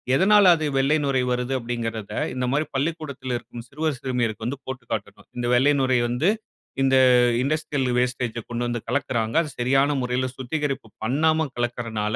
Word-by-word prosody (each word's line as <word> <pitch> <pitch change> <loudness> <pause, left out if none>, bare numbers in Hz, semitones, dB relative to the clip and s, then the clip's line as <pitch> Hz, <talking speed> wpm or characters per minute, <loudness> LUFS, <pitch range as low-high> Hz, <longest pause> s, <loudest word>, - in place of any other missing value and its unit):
எதனால 205 +5 +5
அது 155 - -3
வெள்ளை 140 +3 +3
நுரை 135 -2 +1
வருது, 125 +1 -1
அப்பிடிங்கிறத 115 -3 -4 0.2
இந்தமாரி 130 +4 0
பள்ளிக்கூடத்தில 140 -4 -2
இருக்கும் 120 0 -10
சிறுவர் 150 -1 -2
சிறுமியருக்கு 120 -4 -2
வந்து 135 +2 -3
போட்டு 130 -2 -6
காட்டணும். 100 -2 -5
இந்த 120 0 -1
வெள்ளை 135 +4 +4
நுரை 130 -2 +2
வந்து, 125 +10 +1 0.5
இந்த 135 0 +3 0.5
இண்டஸ்ட்ரியல் 145 -1 -1
வேஸ்டேஜ் 125 -2 -1
ஜ - - -2
கொண்டு 120 0 -2
வந்து 120 0 -2
கலக்குறாங்க. 120 -2 -1
அது 155 - -5
சரியான 135 +3 +3
முறையில 125 +1 -1
சுத்திகரிப்பு 135 -1 -3 0.2
பண்ணாம 155 +6 +2
கலக்கிறனால, 115 -3 -2
130 Hz, 155 wpm, -24 LUFS, 120-140 Hz, 0.5 s, எதனால